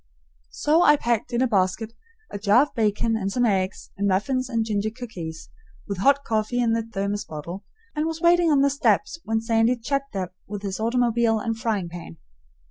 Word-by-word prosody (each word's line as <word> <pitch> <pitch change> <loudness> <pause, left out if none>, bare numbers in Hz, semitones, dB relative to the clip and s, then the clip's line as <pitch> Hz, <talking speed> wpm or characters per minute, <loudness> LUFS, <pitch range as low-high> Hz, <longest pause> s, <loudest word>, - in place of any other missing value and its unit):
So 310 - +2
I 295 - +6
packed 235 -5 -1
in 240 +1 +1
a - - +3
basket 215 +1 0 0.4
a 205 - -5
jar 210 +5 +5
of 295 - -7
bacon 225 +1 +1
and 195 -3 -2
some 245 +3 +1
eggs 190 -3 -1
and 200 +1 -1
muffins 255 +7 0
and 230 -3 0
ginger 210 -1 -1
cookies, 185 -9 -8 0.4
with 200 -3 -4
hot 280 +6 +3
coffee 220 +1 -1
in 235 -2 +2
the 230 - +1
thermos 205 -2 -3
bottle, 170 +6 -7 0.3
and 305 +1 0
was 325 0 -4
waiting 345 0 +4
on 285 -3 +4
the 280 0 +3
steps 285 +3 +1
when 220 0 0
Sandy 225 +2 +2
chugged 275 +1 -3
up 185 -2 -3
with 205 0 -6
his 195 0 -4
automobile 235 0 +2
and 225 +1 -2
frying 215 -7 -1
pan. 170 - -9
225 Hz, 195 wpm, -24 LUFS, 200-250 Hz, 0.4 s, I